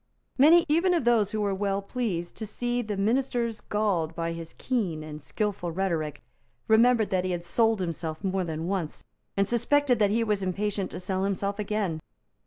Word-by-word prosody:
Many, 325 +5 +6
even 340 +4 +3
of 335 - +1
those 225 -4 +4
who 215 0 -2
were 200 -1 +1
well 195 0 0
pleased 195 -6 -3
to 220 - -5
see 240 +3 -2
the 210 -3 -4
ministers 235 +1 0
galled 185 -7 0
by 165 0 -2
his 165 -1 -8
keen 190 -12 -1
and 155 0 -8
skilful 195 +1 -2
rhetoric, 160 -5 -2 0.4
remembered 225 -1 +4
that 185 -1 +1
he 185 - -2
had 175 -1 -3
sold 225 +4 +2
himself 165 -1 -4
more 190 -1 0
than 160 -1 -4
once, 185 -5 -3 0.3
and 195 0 +3
suspected 245 +2 +2
that 205 -2 +4
he 230 +3 +2
was 210 -3 0
impatient 195 +1 -1
to - - -6
sell 185 +1 -2
himself 200 +1 -1
again. 205 -6 -1
200 Hz, 185 wpm, -27 LUFS, 175-225 Hz, 0.4 s, Many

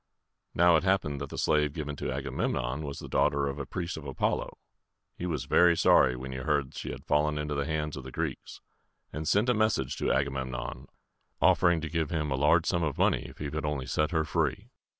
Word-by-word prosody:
Now, 85 -1 +6
it - - -1
happened 90 -8 0
that 70 - -5
the - - -7
slave 75 -1 +2
given 75 -2 -4
to - - -3
Agamemnon 65 +3 -2
was 70 -2 -5
the - - -8
daughter 70 0 +2
of 70 +1 -4
a 70 - -5
priest 85 -2 -4
of 80 - -8
A 70 - -6
pol´lo. - - -1 0.6
He 90 - -4
was 80 -4 -2
very 85 -1 +5
sorry 65 -1 +5
when 65 +1 -6
he 65 - -5
heard 70 -1 0
she - - -6
had - - -7
fallen 75 +1 +1
into 75 0 -2
the 70 +1 -1
hands 75 -1 -2
of 65 - -7
the 65 - -9
Greeks, - - -5 0.5
and 75 +1 -4
sent 105 +4 +3
a 125 - +4
message 110 - +1
to - - 0
Agamemnon, 65 -2 -2 0.5
offering 85 -2 +4
to 80 - -3
give 80 -2 -1
him 75 -3 -2
a - - +1
large 75 +4 +3
sum 85 - +1
of 75 -4 -1
money - - +2
if - - -14
he 75 - -4
would 75 +2 -4
only 75 -3 -2
set 75 +4 0
her 80 -3 +1
free. - - -1
75 Hz, 225 wpm, -29 LUFS, 70-80 Hz, 0.6 s, Now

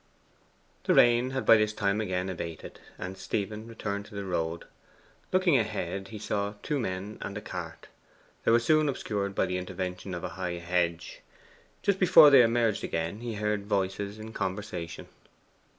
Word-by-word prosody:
The - - +3
rain 120 +1 +5
had 130 0 -3
by 115 - +8
this 105 0 +1
time 100 0 0
again 95 -3 -2
abated, 85 -3 -6 0.2
and 90 +1 -6
Stephen 105 +3 -4
returned 105 -3 -4
to 105 - -13
the 100 0 -4
road. 85 -2 -2 0.7
Looking 185 -7 +4
ahead, 95 -3 -3
he 110 - -8
saw 105 0 -2
two 150 -2 -1
men 100 -1 -4
and 100 - -5
a - - -3
cart. - - -7 0.6
They - - +2
were 115 +1 +6
soon 155 +5 +3
obscured 100 -6 -3
by - - +2
the 90 0 -2
intervention 90 0 -5
of 85 - -6
a - - -3
high 90 -1 -4
hedge. 85 -1 -2 0.6
Just 200 -1 +2
before 165 -5 +8
they 135 -2 +9
emerged 115 -2 +2
again 85 +5 -2
he 120 -1 -5
heard 105 -1 -1
voices 100 +1 -1
in 110 +1 -9
conversation. 95 -5 -4
100 Hz, 165 wpm, -29 LUFS, 90-115 Hz, 0.7 s, they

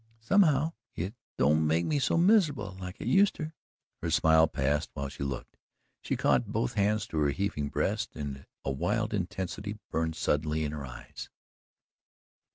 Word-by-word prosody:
"Somehow 155 - +3 0.2
it 90 +5 -3 0.2
don't 75 +3 +3
make 80 +2 +2
me 150 - +1
so 135 - +2
miserable, 160 - +3
like 90 +1 -7
it - - -6
useter." 190 -5 +3 0.5
Her 85 - -1
smile 80 +1 +5
passed 75 +2 0
while 70 -1 -3
she 70 - -11
looked, 70 -1 -4 0.4
she - - -2
caught 65 -4 +2
both 60 - 0
hands 105 0 +1
to 80 - -1
her 75 -1 +3
heaving 75 -3 -1
breast - - -1
and 70 -2 -6 0.2
a 70 - 0
wild 105 - 0
intensity 95 +1 -3
burned 80 0 0
suddenly 75 0 0
in 75 - -2
her 75 -3 -5
eyes. - - -9
80 Hz, 160 wpm, -30 LUFS, 75-105 Hz, 0.5 s, smile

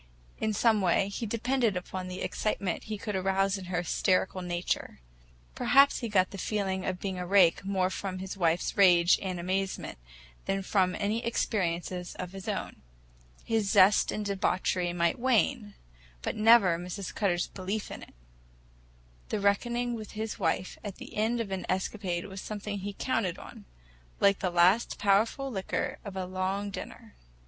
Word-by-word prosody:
In 220 - 0
some 215 0 +3
way 190 +2 +2
he 225 +3 -4
depended 230 -1 0
upon 185 +1 -5
the 185 +1 -5
excitement 200 -4 -2
he 215 -1 -4
could 210 0 -4
arouse 195 +1 +1
in 185 - -8
her 175 -1 -2
hysterical 185 +2 +1
nature. 175 0 -3 0.5
Perhaps 275 - +4
he 235 - -4
got 185 -3 +2
the 195 - -7
feeling 190 -3 -1
of 185 -1 -2
being 190 -1 -4
a 180 - -4
rake 190 -3 +5
more 190 -1 0
from 190 -1 -4
his 190 +1 -6
wife's 170 -2 0
rage 175 -3 +6
and 185 -2 -3
amazement 190 - -2 0.5
than 195 0 -1
from 185 -2 +1
any 215 +3 -1
experiences 180 -6 -2
of 180 -1 -6
his 195 -1 -9
own. - - -4 0.6
His 220 -3 0
zest 195 +2 +5
in 215 - -3
debauchery 185 -2 0
might 170 +2 0
wane, 240 -3 +1 0.5
but - - -2
never 215 -6 +5
Mrs. 180 +2 -6
Cutter's 180 -5 +1
belief 200 +3 -4
in - - -7
it. - - -14 1.1
The - - -1
reckoning 240 +4 +1
with 220 -2 -7
his 220 0 -4
wife 185 0 -1
at 205 -3 -6
the - - -11
end 225 +3 +1
of 220 -4 -3
an 190 -1 -3
escapade 185 -1 -2
was 190 -1 -7
something 205 -1 -5
he 200 +1 -5
counted 195 -5 -1
on—like - - -3
the 185 - 0
last 180 +6 +3
powerful 220 +7 +2
liqueur 190 -4 -3
after 200 -2 -7
a - - -3
long 190 +2 -2
dinner. - - -9
195 Hz, 165 wpm, -29 LUFS, 185-210 Hz, 1.1 s, rage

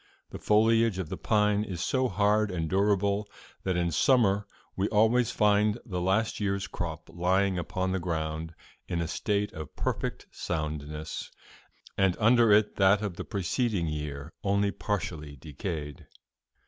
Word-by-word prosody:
'The - - -7
foliage 110 0 +3
of 90 -5 -4
the - - -3
pine 105 -1 +2
is 95 -5 -5
so 130 +8 +1
hard 105 +1 +2
and 85 -4 -2
durable 100 +1 +1 0.3
that 95 -2 -1
in 85 -1 0
summer 105 - +3 0.3
we 95 +2 0
always 110 +2 +3
find 105 +1 +3
the 90 -5 -3
last 100 +5 +1
year's 100 -1 -1
crop 85 -6 -5
lying 95 +2 +1
upon 95 +3 -2
the 95 - 0
ground 80 -1 -3 0.3
in 85 - -2
a 85 - -1
state 105 +4 -1
of 80 -2 -8
perfect - - -3
soundness, 75 -2 -4 0.7
and 95 -2 +3
under 115 0 +5
it 105 0 +4
that 100 +1 +4
of 100 -5 -3
the - - -5
preceding 100 0 -1
year 75 -1 -5
only 100 0 +2
partially 80 -9 -4
decayed.'" 75 +1 -6
95 Hz, 150 wpm, -28 LUFS, 85-105 Hz, 0.7 s, under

